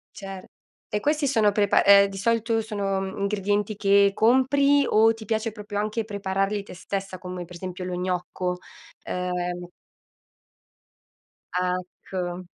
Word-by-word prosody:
Cer 195 Hz, -2 st, -8 dB, 0.4 s
e 210 Hz, -, -2 dB
questi 300 Hz, +2 st, +1 dB
sono 225 Hz, -6 st, +3 dB
prepa 205 Hz, 0 st, +3 dB
eh 200 Hz, 0 st, +7 dB
di 195 Hz, -, -8 dB
solito 230 Hz, +2 st, +1 dB
sono, 200 Hz, -3 st, -2 dB
uhm, 190 Hz, +1 st, -4 dB
ingredienti 205 Hz, +1 st, 0 dB
che 200 Hz, 0 st, +4 dB
compri, 275 Hz, +5 st, +4 dB
o 220 Hz, +1 st, +5 dB
ti 225 Hz, -1 st, -10 dB
piace 220 Hz, +1 st, -1 dB
proprio 210 Hz, -1 st, -8 dB
anche 215 Hz, +2 st, -2 dB
prepararli 200 Hz, -1 st, -1 dB
te 200 Hz, -, -12 dB
stessa, 195 Hz, +1 st, -5 dB
come 180 Hz, 0 st, -6 dB
per 175 Hz, +1 st, -12 dB
esempio 185 Hz, +1 st, -6 dB
lo 180 Hz, -1 st, -3 dB
gnocco, 180 Hz, 0 st, -2 dB, 0.4 s
ehm 180 Hz, -1 st, -3 dB, 1.9 s
Ecco. 180 Hz, 0 st, -3 dB
200 Hz, 135 wpm, -25 LUFS, 185-220 Hz, 1.9 s, eh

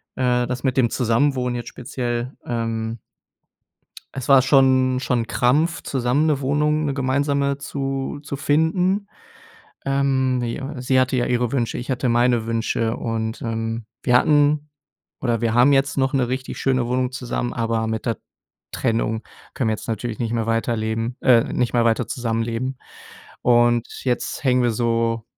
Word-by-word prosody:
Äh, 125 Hz, -1 st, +1 dB
das 125 Hz, 0 st, -4 dB
mit 130 Hz, -2 st, 0 dB
dem 120 Hz, -3 st, +4 dB
Zusammenwohnen 125 Hz, +1 st, +1 dB
jetzt 120 Hz, -, -5 dB
speziell, 120 Hz, 0 st, -4 dB
ähm 115 Hz, -1 st, -3 dB, 1.2 s
es 130 Hz, -1 st, -5 dB
war 135 Hz, -1 st, +8 dB
schon 130 Hz, -1 st, +4 dB
schon 125 Hz, -2 st, 0 dB
'n 115 Hz, -, -5 dB
Krampf 150 Hz, +9 st, +1 dB
zusammen 135 Hz, +4 st, 0 dB
'ne 150 Hz, -3 st, +1 dB
Wohnung, 150 Hz, +3 st, +1 dB
'ne 140 Hz, -, -1 dB
gemeinsame 140 Hz, +1 st, 0 dB
zu 135 Hz, 0 st, -4 dB
zu 140 Hz, -, -5 dB
finden. 170 Hz, +7 st, +1 dB, 0.8 s
Ähm, 135 Hz, -2 st, +1 dB
ja, 135 Hz, +4 st, -4 dB
sie 130 Hz, +1 st, +2 dB
hatte 130 Hz, 0 st, +2 dB
ja 120 Hz, -, +1 dB
ihre 120 Hz, -1 st, 0 dB
Wünsche, 120 Hz, -4 st, -1 dB
ich 125 Hz, -, -5 dB
hatte 130 Hz, 0 st, 0 dB
meine 120 Hz, -1 st, +2 dB
Wünsche 115 Hz, 0 st, -1 dB
und, 110 Hz, -1 st, -3 dB
ähm, 115 Hz, 0 st, -3 dB, 0.2 s
wir 125 Hz, -1 st, +4 dB
hatten, 145 Hz, +2 st, +3 dB, 0.5 s
oder 120 Hz, -3 st, 0 dB
wir 115 Hz, -1 st, +1 dB
haben 125 Hz, +4 st, +5 dB
jetzt 140 Hz, +1 st, +1 dB
noch 135 Hz, 0 st, +1 dB
'ne 130 Hz, -3 st, +1 dB
richtig 130 Hz, +1 st, -4 dB
schöne 130 Hz, -3 st, +1 dB
Wohnung 125 Hz, +1 st, 0 dB
zusammen, 120 Hz, -1 st, -3 dB
aber 115 Hz, -1 st, -1 dB
mit 110 Hz, +1 st, -3 dB
der 115 Hz, -3 st, 0 dB, 0.6 s
Trennung 110 Hz, 0 st, -1 dB, 0.3 s
können 130 Hz, -7 st, 0 dB
wir 110 Hz, -, +1 dB
jetzt -, -, -8 dB
natürlich 115 Hz, 0 st, -3 dB
nicht 115 Hz, -1 st, -2 dB
mehr 115 Hz, -1 st, -1 dB
weiterleben 115 Hz, +1 st, -1 dB
äh, 120 Hz, -3 st, +5 dB
nicht 125 Hz, 0 st, 0 dB
mehr 120 Hz, -1 st, +3 dB
weiter 115 Hz, 0 st, +2 dB
zusammenleben. 115 Hz, +2 st, -2 dB, 0.6 s
Und, 120 Hz, -1 st, +2 dB
jetzt 125 Hz, -2 st, -2 dB
hängen 125 Hz, -1 st, +3 dB
wir 120 Hz, -, +2 dB
so 115 Hz, 0 st, 0 dB
125 Hz, 160 wpm, -22 LUFS, 115-135 Hz, 1.2 s, war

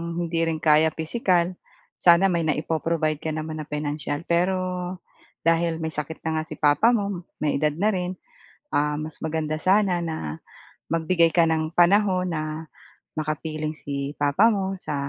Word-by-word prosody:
hindi 170 Hz, -1 st, -1 dB
rin 160 Hz, -1 st, -2 dB
kaya 155 Hz, 0 st, +5 dB
pisikal, 175 Hz, 0 st, +1 dB, 0.5 s
sana 180 Hz, +2 st, +5 dB
may 170 Hz, -, +1 dB
naipo-provide 155 Hz, 0 st, 0 dB
ka 155 Hz, 0 st, -3 dB
naman 155 Hz, 0 st, -4 dB
na 155 Hz, -, -6 dB
pinansiyal 150 Hz, +1 st, -3 dB
pero, 175 Hz, +3 st, +2 dB, 0.9 s
dahil 165 Hz, 0 st, +1 dB
may 160 Hz, -, -2 dB
sakit 150 Hz, +1 st, -6 dB
na 160 Hz, -1 st, 0 dB
nga 155 Hz, -, -2 dB
si 155 Hz, -, -7 dB
papa 150 Hz, +13 st, +4 dB
mo, 200 Hz, -5 st, -3 dB, 0.2 s
may 145 Hz, -2 st, +1 dB
edad 150 Hz, 0 st, +1 dB
na 205 Hz, +6 st, +2 dB
rin, 180 Hz, -1 st, -2 dB, 0.6 s
um, 150 Hz, +1 st, +1 dB
mas 155 Hz, 0 st, -8 dB
maganda 155 Hz, -1 st, -2 dB
sana 190 Hz, 0 st, +3 dB
na 155 Hz, -, -4 dB, 0.5 s
magbigay 165 Hz, +1 st, +3 dB
ka 170 Hz, -, +6 dB
ng 160 Hz, 0 st, 0 dB
panahon 185 Hz, 0 st, +4 dB
na 155 Hz, 0 st, -3 dB, 0.6 s
makapiling 155 Hz, 0 st, -3 dB
si 140 Hz, -1 st, -5 dB
papa 145 Hz, +9 st, +3 dB
mo 195 Hz, -4 st, 0 dB
sa, 150 Hz, -, -4 dB
160 Hz, 155 wpm, -24 LUFS, 155-175 Hz, 0.9 s, ka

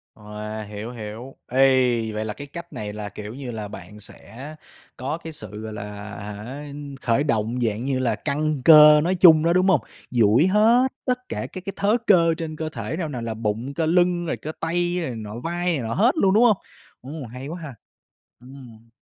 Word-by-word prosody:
Wow, 105 Hz, 0 st, -7 dB
hiểu, 105 Hz, +3 st, -7 dB
hiểu. 115 Hz, +3 st, -8 dB
Ê, 135 Hz, +2 st, +4 dB, 0.5 s
vậy 110 Hz, +1 st, -3 dB
là 105 Hz, -, -4 dB
cái 145 Hz, +4 st, -9 dB
cách 170 Hz, +2 st, -9 dB
này 105 Hz, -4 st, -5 dB
là, 105 Hz, -1 st, -6 dB
kiểu 105 Hz, +2 st, -8 dB
như 130 Hz, -1 st, -6 dB
là, 110 Hz, -2 st, -5 dB
bạn 105 Hz, +1 st, -11 dB
sẽ 130 Hz, +7 st, -10 dB, 0.4 s
có 135 Hz, +5 st, -3 dB
cái 165 Hz, -1 st, -9 dB
sự, 105 Hz, -6 st, -8 dB
gọi 110 Hz, 0 st, -6 dB
là, 105 Hz, -, -6 dB, 0.4 s
hả, 105 Hz, +7 st, -7 dB, 0.4 s
khởi 120 Hz, +4 st, +1 dB
động 115 Hz, -3 st, -1 dB
dạng 115 Hz, 0 st, -1 dB
như 135 Hz, -1 st, 0 dB
là 120 Hz, -4 st, +1 dB
căng 150 Hz, +3 st, -2 dB
cơ 150 Hz, -1 st, +9 dB
nói 180 Hz, +4 st, +1 dB
chung 165 Hz, -4 st, +7 dB
đó, 170 Hz, +1 st, +3 dB
đúng 185 Hz, +1 st, +3 dB
hông? 180 Hz, -8 st, +4 dB, 0.3 s
Duỗi 120 Hz, +4 st, +4 dB
hết 225 Hz, +6 st, +4 dB, 0.2 s
tất 250 Hz, -1 st, -2 dB
cả -, -, -4 dB
các 185 Hz, -, -9 dB
cái 195 Hz, -, -4 dB
thớ 210 Hz, +4 st, +2 dB
cơ 165 Hz, -4 st, +5 dB
trên 160 Hz, -1 st, -5 dB
cơ 155 Hz, 0 st, -4 dB
thể 115 Hz, +2 st, -5 dB
nào 165 Hz, -4 st, -3 dB
nào 125 Hz, -5 st, -5 dB
là 115 Hz, -1 st, -3 dB
bụng, 110 Hz, +4 st, -3 dB
cơ 160 Hz, +1 st, -1 dB
lưng, 175 Hz, +1 st, +2 dB
rồi 165 Hz, -, -2 dB
cơ 155 Hz, -, -6 dB
tay 175 Hz, +2 st, -1 dB
rồi 165 Hz, -, -2 dB
này 120 Hz, -, -5 dB
nọ, 110 Hz, +1 st, -7 dB
vai 175 Hz, +6 st, -3 dB
này 170 Hz, -5 st, +1 dB
nọ 115 Hz, -, -2 dB
hết 230 Hz, +6 st, +4 dB
luôn, 190 Hz, -9 st, +3 dB
đúng 220 Hz, +4 st, +5 dB
hông? 220 Hz, -5 st, +5 dB, 0.4 s
Ồ, 140 Hz, +2 st, -7 dB
hay 125 Hz, +4 st, -8 dB
quá 170 Hz, +4 st, -6 dB
ha. 145 Hz, -6 st, -8 dB, 0.7 s
Ừm. 125 Hz, -3 st, -14 dB
135 Hz, 215 wpm, -23 LUFS, 110-170 Hz, 0.7 s, cơ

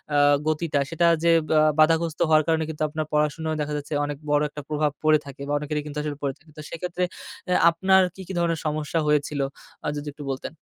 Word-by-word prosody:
আ -, -, +4 dB, 0.3 s
গতিটা 155 Hz, -2 st, 0 dB
সেটা 170 Hz, +1 st, +2 dB, 0.2 s
যে 170 Hz, -, +5 dB, 0.2 s
বা 155 Hz, -, +4 dB, 0.2 s
বাধাগ্রস্থ 165 Hz, +1 st, +3 dB
হওয়ার 155 Hz, -1 st, +5 dB
কারণে 160 Hz, -1 st, +2 dB
কিন্তু 155 Hz, -1 st, -3 dB
আপনার 155 Hz, 0 st, -3 dB
পড়াশোনা 150 Hz, +1 st, 0 dB
দেখা 150 Hz, 0 st, -3 dB
যাচ্ছে 145 Hz, +1 st, -6 dB
অনেক 145 Hz, -1 st, -4 dB
বড় 145 Hz, -, +4 dB
একটা 150 Hz, -, -8 dB
প্রভাব 150 Hz, -1 st, +1 dB
পড়ে 155 Hz, 0 st, +5 dB
থাকে 140 Hz, -1 st, -10 dB
বা 145 Hz, -, -1 dB
অনেকেরই 150 Hz, 0 st, -3 dB
কিন্তু 150 Hz, 0 st, -7 dB
আসলে 145 Hz, -2 st, -4 dB
পড়ে 140 Hz, -, 0 dB
থাকে। 160 Hz, -1 st, -22 dB
তো -, -, -6 dB
সেক্ষেত্রে 180 Hz, +2 st, -3 dB, 0.5 s
আ -, -, +4 dB, 0.2 s
আপনার 190 Hz, +3 st, +4 dB
কি, 190 Hz, -, -9 dB
কি 195 Hz, -, -5 dB
ধরণের 165 Hz, -2 st, 0 dB
সমস্যা 155 Hz, +2 st, -1 dB
হয়েছিল 150 Hz, -1 st, +1 dB, 0.5 s
আ -, -, -1 dB
যদি 145 Hz, 0 st, -6 dB
একটু 145 Hz, 0 st, -9 dB
বলতেন? 135 Hz, +4 st, -5 dB
155 Hz, 215 wpm, -24 LUFS, 150-165 Hz, 0.5 s, যে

